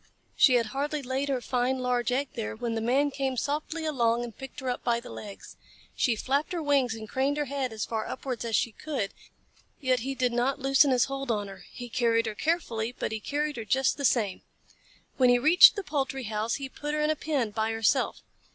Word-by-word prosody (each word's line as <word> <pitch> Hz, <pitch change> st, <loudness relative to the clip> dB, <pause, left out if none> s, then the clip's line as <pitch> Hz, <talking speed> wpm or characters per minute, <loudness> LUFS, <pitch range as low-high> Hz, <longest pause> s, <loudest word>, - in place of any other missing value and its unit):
She 255 Hz, -, +6 dB
had 235 Hz, -1 st, +3 dB
hardly 290 Hz, +1 st, -2 dB
laid 265 Hz, +2 st, -2 dB
her 260 Hz, -2 st, 0 dB
fine 250 Hz, +1 st, 0 dB
large 250 Hz, -1 st, 0 dB
egg 270 Hz, +2 st, 0 dB
there 230 Hz, -5 st, -4 dB
when 235 Hz, +1 st, -3 dB
the 225 Hz, -, -2 dB
Man 270 Hz, +5 st, +2 dB
came 265 Hz, -2 st, -2 dB
softly 305 Hz, +5 st, -2 dB
along 240 Hz, -6 st, +1 dB
and 235 Hz, -2 st, -7 dB
picked 270 Hz, +1 st, -9 dB
her 265 Hz, -, -6 dB
up 250 Hz, -, -2 dB
by 235 Hz, -1 st, +1 dB
the 235 Hz, -, -11 dB
legs. 205 Hz, -2 st, -10 dB, 0.4 s
She 240 Hz, -4 st, +2 dB
flapped 280 Hz, -, -1 dB
her 335 Hz, -2 st, -2 dB
wings 275 Hz, -5 st, +2 dB
and 220 Hz, -1 st, -8 dB
craned 270 Hz, +6 st, 0 dB
her 295 Hz, -, 0 dB
head 275 Hz, -2 st, -2 dB
as 220 Hz, -1 st, -3 dB
far 220 Hz, -1 st, -3 dB
upwards 255 Hz, -3 st, -4 dB
as 230 Hz, -2 st, -1 dB
she 230 Hz, -, +1 dB
could, 260 Hz, -4 st, -4 dB, 0.7 s
yet 260 Hz, -3 st, +1 dB
he 270 Hz, +4 st, -4 dB
did 250 Hz, -2 st, 0 dB
not 245 Hz, +3 st, +1 dB
loosen 275 Hz, +1 st, +4 dB
his 250 Hz, -2 st, +3 dB
hold 275 Hz, -1 st, -5 dB
on 205 Hz, -3 st, 0 dB
her. 190 Hz, -2 st, -11 dB
He 245 Hz, -, -8 dB
carried 230 Hz, -1 st, +1 dB
her 220 Hz, -, -3 dB
carefully, 235 Hz, -5 st, -1 dB
but 250 Hz, -, -4 dB
he 220 Hz, -, -3 dB
carried 295 Hz, +5 st, -2 dB
her 225 Hz, -, -4 dB
just 265 Hz, +5 st, +2 dB
the 285 Hz, -, -5 dB
same. 215 Hz, -8 st, +1 dB, 0.8 s
When 255 Hz, -2 st, +5 dB
he 245 Hz, -, +6 dB
reached 315 Hz, -, +8 dB
the 405 Hz, -, -3 dB
poultry 270 Hz, -4 st, -2 dB
house, 215 Hz, +1 st, -1 dB
he 275 Hz, -1 st, -5 dB
put 295 Hz, +3 st, -4 dB
her 305 Hz, -, 0 dB
in 300 Hz, +1 st, +2 dB
a -, -, 0 dB
pen 280 Hz, -8 st, -1 dB
by 220 Hz, +1 st, -1 dB
herself. 225 Hz, -1 st, +1 dB
255 Hz, 225 wpm, -28 LUFS, 230-280 Hz, 0.8 s, reached